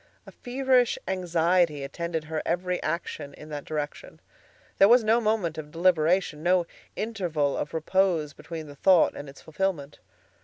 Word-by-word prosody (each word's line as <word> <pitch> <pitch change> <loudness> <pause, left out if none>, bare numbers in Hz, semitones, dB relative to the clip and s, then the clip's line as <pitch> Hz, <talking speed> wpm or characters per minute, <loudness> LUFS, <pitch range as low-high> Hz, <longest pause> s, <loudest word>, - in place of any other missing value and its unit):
A - - -12
feverish 255 -1 +1
anxiety 175 -4 +1
attended 165 +3 -4
her 155 0 -3
every 180 +1 -1
action 155 -3 -4
in 150 - -12
that 145 -2 -6
direction. 150 -1 -5 0.6
There 195 - +8
was 240 +2 +6
no 225 +2 +3
moment 210 -8 0
of 150 -1 -8
deliberation, 170 -1 +1
no 175 +1 +2 0.3
interval 175 -10 -1
of 150 - -3
repose 165 -2 +1
between 160 -2 -8
the 145 - -11
thought 180 +4 +4
and 145 - -8
its 135 - -14
fulfillment. 160 -4 -3
170 Hz, 150 wpm, -26 LUFS, 155-190 Hz, 0.6 s, There